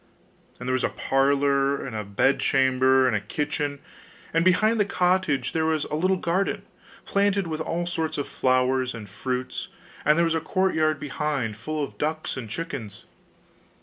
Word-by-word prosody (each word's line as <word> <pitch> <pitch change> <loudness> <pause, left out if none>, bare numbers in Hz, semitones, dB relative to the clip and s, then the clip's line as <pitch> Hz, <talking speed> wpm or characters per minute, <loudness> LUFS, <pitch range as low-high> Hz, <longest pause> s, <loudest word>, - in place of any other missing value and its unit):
And 125 - -6
there 130 - +1
was 130 - 0
a - - +2
parlour, 140 0 +1
and 125 -4 -6
a 110 - -2
bedchamber, 130 +4 +3
and 125 -4 +2
a 105 - 0
kitchen; 145 +6 -2 0.6
and 165 +1 +3
behind 215 +5 +3
the - - +5
cottage 180 -6 +1
there 160 -1 +1
was 155 -2 +1
a - - -8
little 185 +4 +2
garden, 180 +3 -1 0.4
planted 200 -1 +1
with 160 -1 -3
all 170 +2 -2
sorts 165 -2 -2
of 145 - -2
flowers 130 0 +1
and 110 -3 -8
fruits; 125 +5 -4 0.4
and 150 +1 +4
there 170 - +4
was 165 - +1
a 160 - 0
courtyard 160 -5 +1
behind, 145 -6 -2
full 150 +7 -3
of 140 - -7
ducks 155 +1 -2
and 120 -5 -6
chickens. 115 - -6
145 Hz, 170 wpm, -25 LUFS, 130-165 Hz, 0.6 s, the